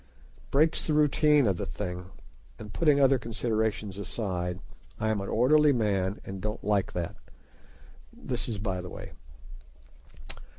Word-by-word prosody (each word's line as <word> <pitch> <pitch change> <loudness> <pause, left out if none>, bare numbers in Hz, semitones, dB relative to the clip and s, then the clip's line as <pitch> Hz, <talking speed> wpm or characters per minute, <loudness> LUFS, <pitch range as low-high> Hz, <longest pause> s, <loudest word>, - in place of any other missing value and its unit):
It - - -24
breaks 155 +4 +2
the 155 - +1
routine 150 -1 +4
of 95 -4 +1
the - - -3
thing, 90 -2 -5 0.5
and 105 -1 -9
putting 150 -4 +3
other 135 -1 +5
considerations 110 -3 -2
aside, 90 -4 -3 0.4
I 110 - 0
am 105 -2 0
an 100 - -5
orderly 145 +5 +4
man 100 -4 0
and 95 0 -6
don't 105 +1 -4
like 100 -2 +1
that. 85 -2 -3 1.0
This 125 -1 -4
is 110 - -3
by 95 -3 -2
the 90 - -7
way. - - -9
105 Hz, 145 wpm, -28 LUFS, 95-135 Hz, 1.0 s, other